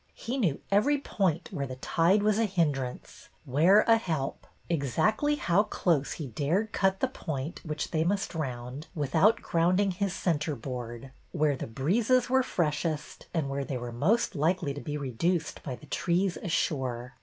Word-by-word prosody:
He 255 Hz, +4 st, -3 dB
knew 170 Hz, -, +1 dB
every 260 Hz, +9 st, +4 dB
point 185 Hz, -, -1 dB
where 140 Hz, -7 st, -3 dB
the 130 Hz, -, -6 dB
tide 170 Hz, +9 st, +2 dB
was 215 Hz, 0 st, +3 dB
a 225 Hz, -, +3 dB
hindrance, 150 Hz, -10 st, -2 dB, 0.2 s
where 165 Hz, +11 st, +5 dB
a 230 Hz, 0 st, +5 dB
help; 160 Hz, -10 st, -3 dB, 0.2 s
exactly 175 Hz, -, +1 dB
how 185 Hz, -8 st, +3 dB
close 170 Hz, -8 st, 0 dB
he 155 Hz, -, -5 dB
dared 155 Hz, -, -1 dB
cut 190 Hz, 0 st, +1 dB
the 265 Hz, -, +3 dB
point, 155 Hz, -, -5 dB
which 155 Hz, -3 st, -4 dB
they 160 Hz, -1 st, +1 dB
must 195 Hz, +3 st, -1 dB
round, 130 Hz, -2 st, -5 dB
without 160 Hz, -, +3 dB
ground 175 Hz, +3 st, +2 dB
ing 200 Hz, -1 st, +2 dB
his 195 Hz, +1 st, -1 dB
centreboard; 130 Hz, -7 st, -3 dB, 0.2 s
where 150 Hz, -4 st, +2 dB
the -, -, -5 dB
breezes 225 Hz, -, +1 dB
were 260 Hz, 0 st, +5 dB
freshest, 155 Hz, -, -2 dB
and 160 Hz, -5 st, -1 dB
where 140 Hz, 0 st, -2 dB
they 135 Hz, -1 st, -3 dB
were 120 Hz, -1 st, -5 dB
most 180 Hz, -, +1 dB
likely 165 Hz, -1 st, 0 dB
to 145 Hz, -, -7 dB
be 150 Hz, -1 st, -4 dB
reduced 155 Hz, +5 st, -1 dB
by 130 Hz, -4 st, -5 dB
the 115 Hz, -, -15 dB
trees 180 Hz, +1 st, 0 dB
ashore. 130 Hz, -, -2 dB
160 Hz, 165 wpm, -29 LUFS, 140-195 Hz, 0.2 s, where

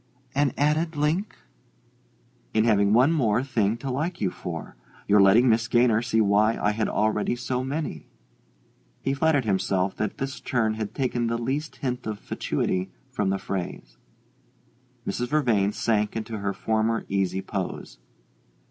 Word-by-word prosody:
"An 140 Hz, -1 st, +2 dB
added 155 Hz, +3 st, +1 dB
link?" 155 Hz, +8 st, 0 dB, 1.2 s
"In 110 Hz, -, +4 dB
having 100 Hz, -3 st, +3 dB
one 125 Hz, +7 st, +5 dB
more 120 Hz, -7 st, +2 dB
thing 115 Hz, -5 st, 0 dB
to 135 Hz, +2 st, -4 dB
like 155 Hz, +7 st, -2 dB
you 95 Hz, -3 st, 0 dB
for 80 Hz, -7 st, -7 dB, 0.3 s
your 105 Hz, 0 st, +6 dB
letting 105 Hz, +6 st, +6 dB
Miss 115 Hz, 0 st, +3 dB
Gaynor 120 Hz, -2 st, +3 dB
see 115 Hz, -2 st, 0 dB
why 105 Hz, +1 st, +3 dB
I 105 Hz, -, +2 dB
had 110 Hz, +1 st, -1 dB
already 105 Hz, +2 st, +1 dB
so 125 Hz, +1 st, -2 dB
many." 135 Hz, -, -4 dB, 1.0 s
He 135 Hz, -, +1 dB
flattered 145 Hz, -2 st, +2 dB
himself 95 Hz, -1 st, 0 dB
that 105 Hz, -, -2 dB
this 135 Hz, +2 st, -4 dB
turn 115 Hz, -4 st, 0 dB
had 110 Hz, -1 st, -5 dB
taken 125 Hz, -3 st, 0 dB
the 115 Hz, 0 st, 0 dB
least 140 Hz, +6 st, -3 dB
hint 125 Hz, -3 st, -3 dB
of 105 Hz, -1 st, -3 dB
fatuity 95 Hz, -2 st, -2 dB, 0.2 s
from 105 Hz, -7 st, 0 dB
the 95 Hz, -, +1 dB
phrase. 85 Hz, -12 st, -5 dB, 1.1 s
Mrs. 125 Hz, -, -2 dB
Vervain 120 Hz, -9 st, +2 dB
sank 105 Hz, -1 st, 0 dB
into 110 Hz, -1 st, -4 dB
her 100 Hz, 0 st, -1 dB
former 110 Hz, +2 st, 0 dB
easy 95 Hz, -1 st, -1 dB
pose. 95 Hz, -, -5 dB
115 Hz, 150 wpm, -25 LUFS, 100-130 Hz, 1.2 s, your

